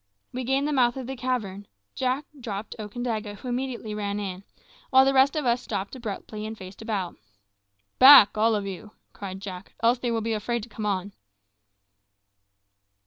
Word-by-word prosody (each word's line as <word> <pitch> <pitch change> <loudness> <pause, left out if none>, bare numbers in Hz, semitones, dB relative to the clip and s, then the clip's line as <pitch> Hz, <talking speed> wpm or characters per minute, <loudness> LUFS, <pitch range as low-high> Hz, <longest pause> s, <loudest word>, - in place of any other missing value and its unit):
We 255 +1 -3
gained 270 +3 +1
the 300 - -1
mouth 245 -2 +3
of 260 - -5
the 265 +2 -5
cavern; 220 -6 -3 0.3
Jack 260 +3 -1
dropped 215 -3 -5
Okandaga, 215 -1 -4
who 250 - -10
immediately 245 -3 -3
ran 205 -1 -2
in, 190 -2 -5 0.5
while 265 0 +6
the 270 - +3
rest 270 +2 +4
of 305 -3 -1
us 240 0 +2
stopped 200 +1 -4
abruptly 215 -2 -6
and 220 0 -7
faced 185 +1 -11
about. 205 -5 -3 0.8
"Back, 260 -6 +10
all 220 +1 +3
of 205 -1 -2
you," 200 +2 -7 0.2
cried 190 -1 -7
Jack, 190 -2 -8
"else 235 +2 +4
they 245 - -2
will 230 -1 0
be 225 +1 -1
afraid 225 +2 -2
to 235 - -10
come 215 -1 -4
on." 195 0 -1
225 Hz, 175 wpm, -26 LUFS, 205-255 Hz, 0.8 s, Back